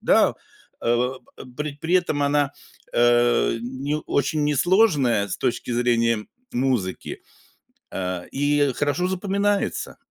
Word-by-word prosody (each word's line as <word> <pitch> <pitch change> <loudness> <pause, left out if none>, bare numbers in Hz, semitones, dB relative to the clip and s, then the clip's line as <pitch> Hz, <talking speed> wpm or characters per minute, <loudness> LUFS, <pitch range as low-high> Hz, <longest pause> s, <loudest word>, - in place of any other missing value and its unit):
да. - - +4 0.5
Э, 120 +2 +1 0.4
при 150 -1 -3
при 170 +4 -1
этом 155 -5 +2
она, 145 -1 +1 0.4
э, 120 -1 +3
ни 135 +4 -3
очень 145 +2 0
несложная 145 - +3
с - - -4
точки 120 - -2
зрения 115 -2 +1 0.3
музыки, 120 -8 -2 0.7
э, 90 -1 -4
и 145 -1 +1
хорошо 145 +5 0
запоминается. 200 +2 -1
140 Hz, 105 wpm, -23 LUFS, 120-150 Hz, 0.7 s, да